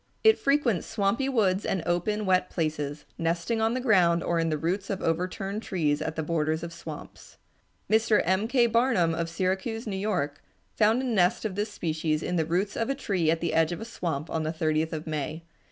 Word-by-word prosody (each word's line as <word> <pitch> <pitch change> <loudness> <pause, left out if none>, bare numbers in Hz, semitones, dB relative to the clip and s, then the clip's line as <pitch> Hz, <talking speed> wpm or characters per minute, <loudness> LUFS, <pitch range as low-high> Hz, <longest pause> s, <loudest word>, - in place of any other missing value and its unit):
It 440 0 +6
frequents 275 - +1
swampy 225 +5 0
woods 200 -6 +2
and 185 -4 -1
open, 205 +5 0
wet 185 -1 +2
places, 150 -3 -3
nesting 170 +7 0
on 225 +2 +2
the - - 0
ground 180 -9 +3
or 170 -1 0
in 165 0 +1
the 155 - 0
roots 180 +6 -2
of 195 - -2
overturned 185 +5 -2
trees 155 -9 0
at 160 - -3
the 160 - -2
borders 160 0 0
of 170 0 -6
swamps. 170 - -10 0.5
Mr. 220 0 +3
M. 190 +5 +1
K. 245 0 +4
Barnum 230 -8 +2
of 165 0 -2
Syracuse, 190 +6 -2
New 205 -3 -3
York, 180 -8 -2 0.3
found 220 +4 +3
a - - -2
nest 220 -3 +2
of 210 - -1
this 205 +2 -2
species 155 -3 -1
in 180 - -2
the 160 -2 +1
roots 185 +4 0
of 230 - -1
a 275 - +1
tree 190 - 0
at 165 0 +1
the 170 - -1
edge 165 0 +3
of 175 - -4
a 225 - -6
swamp 165 -9 -3
on 160 - -1
the 155 0 -1
30th 160 0 0
of 155 -1 -4
May. 155 +1 -4
180 Hz, 210 wpm, -27 LUFS, 160-215 Hz, 0.5 s, It